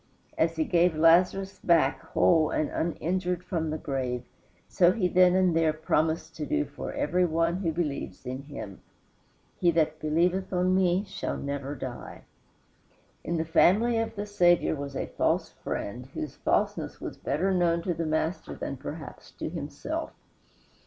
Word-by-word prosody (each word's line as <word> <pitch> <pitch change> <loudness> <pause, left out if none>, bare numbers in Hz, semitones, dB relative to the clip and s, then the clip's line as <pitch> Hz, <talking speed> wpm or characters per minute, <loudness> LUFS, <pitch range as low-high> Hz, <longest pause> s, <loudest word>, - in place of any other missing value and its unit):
As 165 0 +1
he 160 - +1
gave 175 0 +2
Lazarus 180 +4 +3
back 170 -2 +3
whole 160 -3 +3
and 155 - -1
uninjured 180 +2 -1
from 165 -3 -2
the 155 - -2
grave, 130 -4 -3 0.4
so 175 -1 +4
he 185 -2 +1
then 180 0 +5
and 185 -3 +3
there 160 -1 +3
promised 160 +1 0
to 155 - -3
do 75 - +1
for - - -7
every 180 +1 +1
one 165 0 +1
who 180 -4 -1
believes 150 -5 -4
in 130 +2 -4
him: 110 -10 -8 0.8
"He 175 - +4
that 155 -2 +1
believeth 175 +5 +1
on 180 0 +2
me 185 0 +3
shall 195 - -4
never 140 0 -4
die." 130 -3 -7 1.0
In 170 - -2
the 160 - -1
family 210 +8 +4
of 225 0 -2
the 205 0 -3
Saviour 175 -5 +3
was 140 -1 -6
a - - -2
false - - 0
friend 120 +5 -5
whose 155 - -4
falseness - - -1
was - - -6
better 190 +6 0
known 170 -2 +2
to 175 - 0
the 165 0 -3
Master 160 +3 -2
than - - -5
perhaps - - -8
to - - -5
himself. - - -4
165 Hz, 160 wpm, -28 LUFS, 155-180 Hz, 1.0 s, then